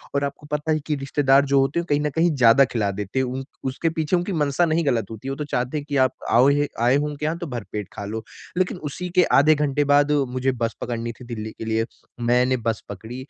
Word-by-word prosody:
और 140 - +1
आपको 140 +1 -5
पता 150 +1 -1
है 155 - +2
कि 150 - 0
रिश्तेदार 140 0 +3
जो 140 0 +3
होते 135 +5 +1
हैं, - - +1
वो - - -15
कहीं 145 0 +3
न - - +2
कहीं 165 +1 +3
ज़्यादा 130 +2 +6
खिला 105 -5 -1
देते 105 +5 -3
हैं। 130 - +2
उन 130 +1 -4 0.2
उसके 135 +5 -1
पीछे 160 +1 0
उनकी 180 +3 -1
मंशा 145 +3 +2
नहीं 165 0 +1
गलत 115 -6 +1
होती 110 +4 -8
है, - - -1
वो - - -3
तो 150 - -4
चाहते 125 +1 -2
हैं, 145 - -5
कि 145 - 0
आप 130 -1 +3 0.2
आओ 125 +4 +5
हे 145 0 +2
आए 125 +2 +4
हो 145 +1 +1
उनके 150 0 -5
यहाँ, 160 +2 -1
तो 170 -2 -5
भरपेट 105 -5 -5
खा 100 - -6
लो। 110 +2 -5 0.3
लेकिन 185 0 0
उसी 180 +4 -5
के 180 - +6 0.2
आधे 155 +2 +5
घंटे 145 -1 +1
बाद 145 +1 +4 0.2
मुझे 130 +1 +1
बस 115 -1 -1
पकड़नी 115 -1 -3
थी, 125 - -13
दिल्ली 110 -2 -6
के - - -6
लिए। 110 0 0 0.4
मैंने 125 +1 +3
बस 115 -2 -2
पकड़ी, 110 +4 -8
135 Hz, 260 wpm, -23 LUFS, 120-150 Hz, 0.4 s, ज़्यादा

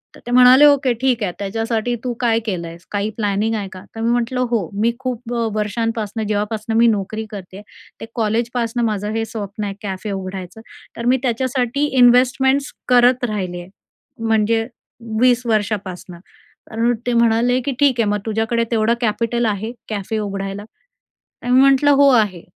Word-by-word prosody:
तर - - -14
ते 240 - -4
म्हणाले, 255 +3 +7
"ओके. 280 -4 +4
ठीक 250 -4 +1
आहे. 180 - -1
त्याच्यासाठी 225 +3 -2
तू 250 -1 -2
काय 230 -2 +2
केलं 175 -5 -3
आहेस? 170 +1 -12
काही 205 +1 -1
प्लॅनिंग 210 +1 0
आहे 200 -2 -3
का?" 185 - -10
तर 225 - -5
मी 230 +1 +1
म्हटलं, 240 +1 0
"हो, 210 -8 0
मी 235 +1 +3
खूप 245 -2 -4
अ, 230 -1 0
वर्षांपासुन 220 0 -2
जेव्हापासुन 215 +1 -2
मी 235 +1 +5
नोकरी 215 +1 -1
करते 190 -2 -9
आहे, 205 - -11 0.4
ते - - -5
कॉलेजपासनं 235 +1 -1
माझं 210 -1 -2
हे 225 0 -1
स्वप्न 210 -1 -6
आहे 200 - -4
कॅफे 200 +1 -4
उघडायचं. 190 +1 -6 0.4
तर 235 - -5
मी 255 +2 +4
त्याच्यासाठी 255 +2 0
इन्व्हेस्टमेंट्स 260 +3 +4 0.2
करत 250 +1 +4
राहिले 190 -6 -3
आहे. 175 - -13 0.6
म्हणजे 225 +1 +1 0.5
20 250 -1 +3
वर्षापासून" 205 -5 -2 0.6
तर 230 +2 +1 0.2
ते 245 - +1
म्हणाले, 235 +2 +3
की 275 - -2
"ठीक 275 -4 +3
आहे. 230 - +3
मग 210 0 0
तुझ्याकडे 225 +2 0
तेवढं 225 0 +2
कॅपिटल 235 +1 0
आहे 215 +1 -2 0.2
कॅफे 215 +1 -3
उघडायला?" 195 -1 -4 0.8
तर 245 - -4
मी 255 +1 +6
म्हटलं, 275 +1 +5
"हो 280 0 +5
आहे." 210 -8 +1
225 Hz, 170 wpm, -19 LUFS, 205-245 Hz, 0.8 s, म्हणाले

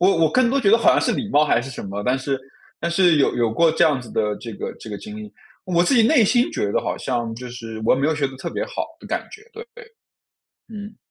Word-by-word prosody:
我 185 - +5
我 155 - +1
更 255 -2 +3
多 275 - +1
觉 205 -6 +3
得 225 - +7
好 - - +3
像 - - +3
是 - - +1
礼 215 - -3
貌 150 -4 +4
还 130 -5 +2
是 135 - -8
什 125 - -7
么， 100 +1 -5
但 125 +4 +1
是 135 0 -3 0.4
但 170 +1 -1
是 175 -2 +4
有 140 - +3
有 115 -2 +1
过 165 +6 +4
这 160 - +3
样 145 -5 +2
子 125 - -11
的 105 -1 0
这 115 -2 -8
个 - - -5
这 - - -9
个 100 - -4
经 215 0 -9
历。 215 0 -9 0.3
我 175 -2 +2
自 265 - +2
己 235 - +5
内 235 -1 +5
心 240 +4 +2
觉 100 - -1
得 - - +2
好 - - -2
像 120 -3 -2
就 125 +1 -8
是 115 -2 -8
我 - - +4
也 130 - -3
没 140 - +2
有 160 - +1
学 145 -2 0
得 135 - -9
特 - - -5
别 - - -3
好 - - -6
的 - - -12
感 - - -3
觉， 435 - -12
对 455 +1 -9
对， - - -12 0.8
嗯。 210 -1 -9
155 Hz, 315 characters per minute, -22 LUFS, -, 0.8 s, 得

